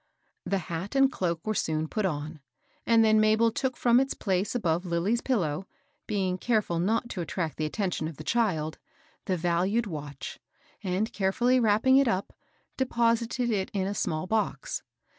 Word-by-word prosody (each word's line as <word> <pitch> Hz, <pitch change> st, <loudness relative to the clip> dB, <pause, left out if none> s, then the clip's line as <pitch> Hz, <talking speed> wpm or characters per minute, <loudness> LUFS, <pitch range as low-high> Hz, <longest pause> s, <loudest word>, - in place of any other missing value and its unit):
The 195 Hz, -, +1 dB
hat 170 Hz, +8 st, -5 dB
and 270 Hz, -1 st, +5 dB
cloak 170 Hz, -6 st, -2 dB
were 215 Hz, -, 0 dB
soon 155 Hz, -5 st, -1 dB
put 210 Hz, +3 st, 0 dB
on; 155 Hz, -1 st, -4 dB, 0.5 s
and 230 Hz, -1 st, +5 dB
then 215 Hz, 0 st, +5 dB
Mabel 220 Hz, +1 st, +4 dB
took 260 Hz, +2 st, -2 dB
from 240 Hz, 0 st, +4 dB
its 270 Hz, +1 st, 0 dB
place 190 Hz, +3 st, -1 dB
above 175 Hz, -6 st, +1 dB
Lilly's 185 Hz, +7 st, 0 dB
pillow, 190 Hz, -, -1 dB, 0.4 s
be 195 Hz, -3 st, 0 dB
ing 185 Hz, 0 st, -2 dB
careful 210 Hz, -8 st, +1 dB
not 220 Hz, +7 st, +1 dB
to 185 Hz, -, -4 dB
attract 165 Hz, -2 st, -3 dB
the 155 Hz, -, -1 dB
attention 180 Hz, -2 st, -2 dB
of 160 Hz, -3 st, -8 dB
the 155 Hz, -, -8 dB
child, 160 Hz, -6 st, 0 dB, 0.5 s
the 185 Hz, -, 0 dB
valued 180 Hz, +7 st, +1 dB
watch, 145 Hz, -7 st, -7 dB, 0.4 s
and, 195 Hz, +5 st, -1 dB
carefully 240 Hz, +6 st, +2 dB
wrapping 225 Hz, +4 st, +4 dB
it 275 Hz, -1 st, +4 dB
up, 190 Hz, -3 st, -1 dB, 0.4 s
deposited 235 Hz, -1 st, +1 dB
it 195 Hz, -3 st, -1 dB
in 190 Hz, -1 st, +1 dB
a 200 Hz, -, -2 dB
small 155 Hz, -4 st, -1 dB
box. 220 Hz, -, -1 dB
195 Hz, 170 wpm, -28 LUFS, 170-230 Hz, 0.5 s, and